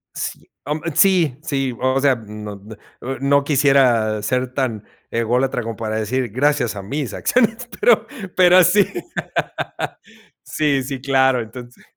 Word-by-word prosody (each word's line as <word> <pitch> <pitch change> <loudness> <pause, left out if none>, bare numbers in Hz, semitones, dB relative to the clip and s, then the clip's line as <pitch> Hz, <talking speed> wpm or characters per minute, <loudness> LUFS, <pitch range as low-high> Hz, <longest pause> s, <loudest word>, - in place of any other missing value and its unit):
Sí, - - -6
am, 150 +1 -3
eh, 170 - -1
sí. 175 -9 +3
Sí, 135 -5 -2
o 130 +1 +1
sea, 135 -2 +3
no 105 -2 -8 0.5
no 135 +2 -4
no 140 +1 +3
quisiera 130 -7 +3
ser 125 +3 -1
tan 115 -6 -2 0.2
ególatra 125 +3 0
como 115 -1 -5
para 110 0 -4
decir 120 +3 -1
gracias 130 -3 +1
a 100 - -5
mis 135 +6 -4
acciones, 240 0 +1
pero 475 +4 +4 0.3
pero 180 0 +6
sí. 195 +3 +4 1.6
Sí, 145 -4 0
sí, 135 0 -5
claro, 130 -2 +2
entonces 120 +2 -11
130 Hz, 140 wpm, -20 LUFS, 115-145 Hz, 1.6 s, pero